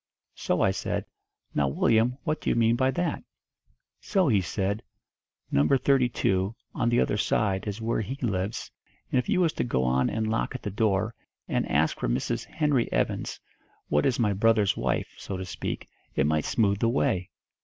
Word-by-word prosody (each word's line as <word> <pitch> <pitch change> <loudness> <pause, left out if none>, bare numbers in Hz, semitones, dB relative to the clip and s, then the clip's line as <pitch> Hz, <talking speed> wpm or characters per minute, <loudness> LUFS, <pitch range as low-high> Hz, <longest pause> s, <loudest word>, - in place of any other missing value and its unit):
So - - -1
I - - +4
said, - - -2 0.5
'Now, 70 - +2
Willyum, 115 - +2
what 155 0 -1
do - - -1
you - - +2
mean 115 0 +4
by 130 +2 +2
that?' 175 +6 -1 0.8
So 190 -7 +1
he 105 -5 +4
said, 100 +3 -2 0.7
'No. 70 +2 +3
32, 120 - +2 0.2
on 120 - +1
the 120 +1 +3
other 105 - +1
side, 100 -2 0
is 105 +2 -4
where 115 0 0
he 125 +6 -4
lives, 105 -5 -2 0.4
and 130 - +3
if 125 - -3
you 185 - +3
was 165 -3 +2
to - - -1
go 65 - 0
on 65 +1 +2
and 110 0 -1
knock 110 +4 -1
at 130 - -6
the 105 - -3
door, 105 +1 +1 0.3
and - - -1
ask 75 +6 +2
for - - -1
Mrs. - - -1
Henry 150 -6 0
Evans, - - -1 0.5
what 75 0 +3
is 125 - +1
my 105 -4 +2
brother's 105 0 +3
wife, - - -1
so 95 - -5
to 95 - -5
speak, 90 - -5 0.3
it 65 - +2
might 75 0 +1
smooth 100 -3 +2
the 115 - +2
way.' 115 -8 0
110 Hz, 185 wpm, -27 LUFS, 95-125 Hz, 0.8 s, I